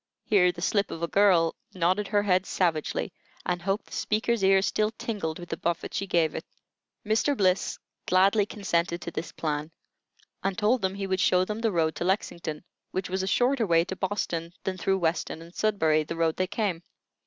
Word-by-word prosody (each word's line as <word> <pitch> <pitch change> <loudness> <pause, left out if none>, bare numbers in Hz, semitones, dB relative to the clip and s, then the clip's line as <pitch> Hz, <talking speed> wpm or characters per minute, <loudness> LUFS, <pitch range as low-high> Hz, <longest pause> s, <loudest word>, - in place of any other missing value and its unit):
Here 180 -4 +4
"the 175 - -8
slip 200 0 +1
of 165 - -6
a - - +1
girl" 180 -4 +4 0.2
nodded 185 +3 +1
her 205 -1 +2
head 185 -2 +2
savagely, 165 -5 -1 0.3
and 175 -1 -1
hoped 195 +4 -1
the - - -15
speaker's 220 0 0
ear 190 0 +5
still 215 +1 +1
tingled 215 -8 -4
with 175 -1 -9
the 165 - -3
buffet 170 -1 -2
she 195 - -2
gave 170 -3 +2
it. - - -4 0.6
Mr. 225 +7 +1
Bliss 185 -1 +1 0.3
gladly 195 +3 +4
consented 170 -5 -1
to 170 - -5
this 165 - -5
plan, 150 -1 -3 0.7
and 195 -1 -1
told 225 +3 +2
them 190 0 -1
he 200 0 -3
would 190 -1 -1
show 180 0 +3
them 210 +3 -4
the 225 -1 +1
road 160 -3 +1
to - - -2
Lexington, 170 -5 -2 0.3
which 185 -1 -4
was 190 0 0
a 190 - -2
shorter 245 +3 +2
way 165 -1 +4
to 190 - -5
Boston 180 -4 -2
than 190 - -2
through 190 +1 +1
Weston 165 -2 -1
and 165 +1 -13
Sudbury, 160 -9 +2
the 165 +2 -5
road 165 -1 +1
they 185 - 0
came. 190 -4 -1
185 Hz, 200 wpm, -27 LUFS, 170-205 Hz, 0.7 s, ear